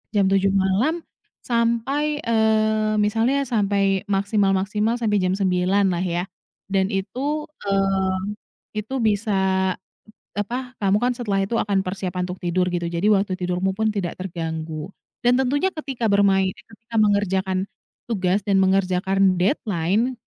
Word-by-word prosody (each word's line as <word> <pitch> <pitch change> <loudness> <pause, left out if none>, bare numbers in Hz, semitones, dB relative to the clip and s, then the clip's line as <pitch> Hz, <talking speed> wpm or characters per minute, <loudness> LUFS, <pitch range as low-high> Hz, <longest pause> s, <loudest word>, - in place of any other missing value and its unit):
Jam 200 -1 +4
07:00 195 0 +3
malam 205 - +1 0.4
sampai, 240 +6 0
eee, 220 -1 +2
misalnya 225 +7 +1
sampai 200 -4 +1
maksimal-maksimal 200 +2 +1
sampai 220 -3 +1
jam 185 +1 0
09:00 190 +1 +2
lah 175 - -1
ya 175 -1 -1 0.5
dan 190 -1 +2
itu, 270 +10 -2 0.2
eee, 195 -1 +1 0.6
itu 240 +6 -6
bisa, 195 -4 +1 0.6
e 205 - 0
apa, 250 +4 -6
kamu 195 0 +3
kan 250 +1 +2
setelah 205 -5 -1
itu 195 +4 -2
akan 200 -2 +1
persiapan 185 -1 -3
untuk 180 - -5
tidur 180 +1 +1
gitu, 175 -1 -2
jadi 170 +3 -2
waktu 200 -2 +2
tidurmu 180 +1 -1
pun 220 0 +1
tidak 185 -4 -3
terganggu, 160 -2 -5 0.3
dan 245 +1 +5
tentunya 285 +7 +1
ketika 270 -6 -4
bermain 195 -1 +3
eh, - - -17
ketika 230 +1 -12
mengerjakan 195 -2 +1 0.5
tugas 195 -2 0
dan 200 -2 +3
mengerjakan 190 0 +2
deadline, 200 - +1
195 Hz, 135 wpm, -22 LUFS, 190-225 Hz, 0.6 s, dan